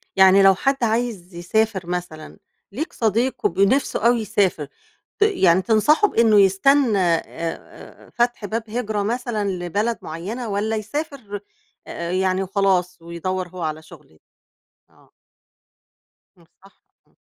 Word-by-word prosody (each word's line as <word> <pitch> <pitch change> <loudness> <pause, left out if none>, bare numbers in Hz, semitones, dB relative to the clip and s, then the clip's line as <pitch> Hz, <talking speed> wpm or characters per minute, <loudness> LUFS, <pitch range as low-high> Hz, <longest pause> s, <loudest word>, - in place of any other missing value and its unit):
يعني 190 +1 +6
لو 195 0 +6
حد 270 +5 -1
عايز 220 -6 -2
يسافر 190 +1 -1
مثلًا، 175 -3 -6 0.3
ليك 310 - -5
صديق 230 +3 -1
وب 180 - 0
نفسه 230 +2 +2
أوي 235 -1 +2
يسافر، 190 -7 0 0.5
ت - - -33
يعني 190 - +3
تنصحه 235 - +3
بإنه 225 - +4
يستنّى 215 +4 +3
آآ، 170 -3 +2
آآ، 165 0 -9
فتح 240 -3 0
باب 225 +3 -3
هجرة 215 -3 -2
مثلًا 225 -2 -2
لبلد 195 +5 -2
معيّنة، 205 +10 -6
والّا 210 +2 -1
يسافر 225 -2 -5 0.5
أ 170 0 -5
أ - - -2
يعني 185 0 0
وخلاص، 190 -2 0
ويدوّر 180 +2 -4
هو 180 0 -9
على 155 -1 -3
شغل - - -16
يعني؟ 80 - -26 0.7
آه. - - -26 1.3
إمم، 170 - -22 0.2
صح، 195 - -22 0.3
اهم. - - -35
200 Hz, 140 wpm, -21 LUFS, 180-230 Hz, 1.3 s, يعني